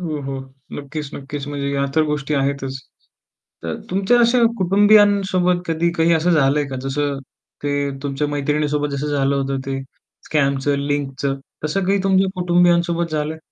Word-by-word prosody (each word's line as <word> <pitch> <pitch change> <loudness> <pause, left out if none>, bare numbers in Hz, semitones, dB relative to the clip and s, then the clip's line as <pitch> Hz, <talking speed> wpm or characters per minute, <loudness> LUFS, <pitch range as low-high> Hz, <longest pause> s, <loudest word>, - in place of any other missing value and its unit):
हो, 155 -4 -3
हो. 135 0 -4 0.4
नक्कीच, 145 0 -6
नक्कीच. 140 0 -6
म्हणजे 140 -1 -3
या 140 0 +1
तर 160 - +5
गोष्टी 150 0 -2
आहेतच. 135 -1 -1 0.8
तर 80 -1 -3 0.2
तुमच्या 195 +6 +2
अशा 235 +1 +4 0.2
कुटुंबियांसोबत 195 -2 +4
कधी 165 +1 +1
काही 165 0 +3
असं 165 +2 +1
झालंय 145 -2 +3
का? 135 - -5
जसं 140 +1 -1 0.4
ते 145 0 -1
तुमच्या 140 +1 -2
मैत्रिणीसोबत 145 0 -1
जसं 140 +2 -3
झालं 140 0 +1
होतं 135 0 -1
ते 135 0 -2 0.5
स्कॅमचं, 140 -1 +1
लिंकचं. 140 -1 -2 0.3
तसं 180 +6 0
काही 200 +1 +2
तुमच्या 190 0 +3
कुटुंबियांसोबत 175 -1 +2
झालंय? 155 +1 -2
150 Hz, 145 wpm, -20 LUFS, 140-175 Hz, 0.8 s, तर